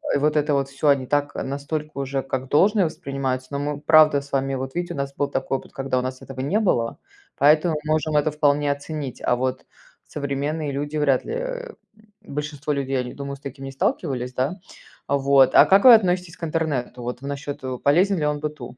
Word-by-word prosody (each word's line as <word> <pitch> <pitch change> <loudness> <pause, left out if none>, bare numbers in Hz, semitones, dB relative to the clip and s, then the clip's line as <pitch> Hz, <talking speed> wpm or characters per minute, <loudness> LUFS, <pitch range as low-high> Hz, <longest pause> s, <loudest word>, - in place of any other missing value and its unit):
И - - +4
вот 150 +2 +1
это 150 0 +1
вот 135 -1 0
всё, 140 +2 -2
они 140 -2 +3
так, 145 +2 0
настолько 145 +3 -4
уже 135 0 -2
как 130 -1 -4
должное 195 +5 +4
воспринимается, 135 -4 -3
но 140 - -2
мы, 145 0 -3
правда, 155 -2 +5
с 140 - -15
вами, 135 0 0
вот 130 0 -5
видите, 175 0 -3
у - - -8
нас 140 0 -3
был 145 - 0
такой 135 - -1
опыт, - - -17
когда 135 -1 -1
у - - -1
нас 130 0 -5
этого 130 -1 -9
не 170 +11 +1
было, 120 - 0 0.4
поэтому 155 +3 +4
мы 155 - -3
можем 155 0 0
это 150 +1 +2
вполне 145 -1 +2
оценить, 140 -2 -5
а 125 - +2
вот 130 +1 -2 0.4
современные 145 +1 -3
люди 145 +2 -4
вряд 140 -4 +2
ли, - - -4
э, - - -4 0.5
большинство 150 0 -4
людей, 135 -1 -1
они, 125 0 -4
думаю, 140 0 -6
с 135 - -18
таким 135 0 -8
не 135 - -6
сталкивались, 125 -1 -2
да. 135 +8 -1 0.5
Вот, 140 -1 +4
а - - +9
как 195 +1 +5
вы 250 - +11
относитесь 180 -5 +2
к - - -15
интернету, 150 -7 -2
вот 125 +2 -5
в - - -9
насчёт, 145 0 -5
э, 130 -1 -3
полезен 180 +7 +3
ли 150 - -1
он 150 0 0
быту? 145 -5 -6
140 Hz, 215 wpm, -23 LUFS, 135-155 Hz, 0.5 s, вы